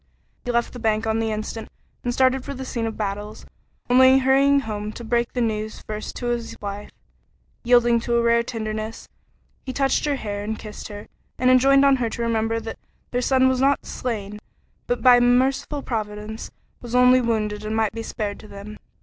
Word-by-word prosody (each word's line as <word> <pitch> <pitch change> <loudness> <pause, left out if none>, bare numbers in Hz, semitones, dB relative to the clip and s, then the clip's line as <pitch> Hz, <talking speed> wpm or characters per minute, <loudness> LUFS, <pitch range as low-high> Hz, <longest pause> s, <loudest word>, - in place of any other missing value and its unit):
He 245 - -1
left 235 0 0
the 245 - -8
bank 220 -1 0
on 220 0 0
the 225 -1 -1
instant 215 +1 -5 0.3
and 245 - -1
started 260 +1 +2
for 280 - -6
the 265 0 -6
scene 230 -3 -2
of 225 - -6
battles, 205 +1 -4 0.4
only 260 +1 +6
hurrying 275 +1 +4
home 210 -3 -4
to 235 - -9
break 235 +1 0
the 245 - -1
news 215 -1 -2
first 215 0 -6
to 245 - -5
his 235 -1 -3
wife. 205 0 -6 0.7
Yielding 240 -1 +4
to 235 +1 -1
a 235 - +3
rare 235 0 +4
tenderness, 220 -1 -5 0.6
he 260 - -5
touched 270 +2 +1
her 290 -1 +1
hair 205 -5 -4
as 210 - -5
he 220 - -1
kissed 215 -1 -9
her, 205 -1 -9 0.3
and 255 0 +3
enjoined 275 +2 +5
on 275 -1 +5
her 235 -2 -1
to 235 - -4
remember 225 0 0
that 225 0 -7 0.3
their 245 - 0
son 260 +1 +3
was 260 0 +1
not 275 +1 +2
slain, 210 -4 -4 0.5
but - - -1
by 250 -1 +8
a - - +3
merciful 260 +4 +2
Providence 215 -1 -5 0.3
was 240 0 -5
only 250 +1 +6
wounded 215 -3 -1
and 215 +1 -3
might 220 -2 +1
be 230 - -5
spared 210 -2 -4
to 215 - -12
them. 205 +1 -10
235 Hz, 200 wpm, -23 LUFS, 215-255 Hz, 0.7 s, by